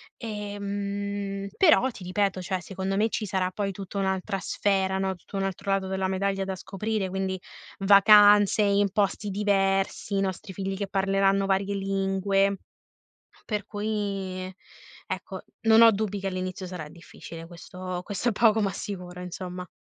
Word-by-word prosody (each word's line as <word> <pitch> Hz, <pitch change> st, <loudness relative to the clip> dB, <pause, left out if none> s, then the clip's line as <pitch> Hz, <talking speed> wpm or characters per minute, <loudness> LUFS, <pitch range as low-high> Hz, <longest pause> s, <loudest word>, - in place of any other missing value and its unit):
Ehm, 200 Hz, -2 st, -4 dB
però 315 Hz, -8 st, +5 dB
ti 190 Hz, -5 st, -11 dB
ripeto, 190 Hz, 0 st, 0 dB
cioè 185 Hz, 0 st, -2 dB
secondo 190 Hz, +1 st, -3 dB
me 215 Hz, +3 st, +2 dB
ci 215 Hz, -, -2 dB
sarà 185 Hz, -2 st, -1 dB
poi 200 Hz, 0 st, -2 dB
tutta 195 Hz, +1 st, -7 dB
un'altra 190 Hz, 0 st, -1 dB
sfera, 190 Hz, +1 st, 0 dB
no, 190 Hz, 0 st, -1 dB
tutto 180 Hz, -, -13 dB
un 195 Hz, -, 0 dB
altro 195 Hz, 0 st, -4 dB
lato 195 Hz, -1 st, +1 dB
della 190 Hz, 0 st, -1 dB
medaglia 195 Hz, +1 st, -1 dB
da 190 Hz, 0 st, -3 dB
scoprire, 195 Hz, +1 st, -3 dB
quindi 190 Hz, 0 st, -2 dB, 0.4 s
vacanze 205 Hz, +1 st, +7 dB
in 200 Hz, 0 st, +3 dB
posti 205 Hz, +1 st, 0 dB
diversi, 195 Hz, 0 st, +1 dB
i -, -, +2 dB
nostri 190 Hz, 0 st, -3 dB
figli 195 Hz, 0 st, -3 dB
che 200 Hz, 0 st, -3 dB
parleranno 195 Hz, 0 st, +2 dB
varie 195 Hz, +1 st, 0 dB
lingue. 195 Hz, 0 st, +1 dB, 0.8 s
Per 210 Hz, -3 st, -3 dB
cui 200 Hz, -3 st, -3 dB, 0.6 s
ecco, -, -, -5 dB, 0.2 s
non 225 Hz, 0 st, +6 dB
ho 230 Hz, 0 st, +9 dB
dubbi 205 Hz, -1 st, -2 dB
che 195 Hz, -, -3 dB
all'inizio 185 Hz, 0 st, -4 dB
sarà 175 Hz, -4 st, -6 dB
difficile, 165 Hz, 0 st, -11 dB
questo 180 Hz, +1 st, -7 dB
questo 205 Hz, +5 st, -1 dB
è -, -, 0 dB
poco 220 Hz, +1 st, +4 dB
ma 200 Hz, -2 st, +1 dB
sicuro 180 Hz, -2 st, -6 dB
insomma. 180 Hz, 0 st, -6 dB
195 Hz, 155 wpm, -26 LUFS, 190-205 Hz, 0.8 s, ho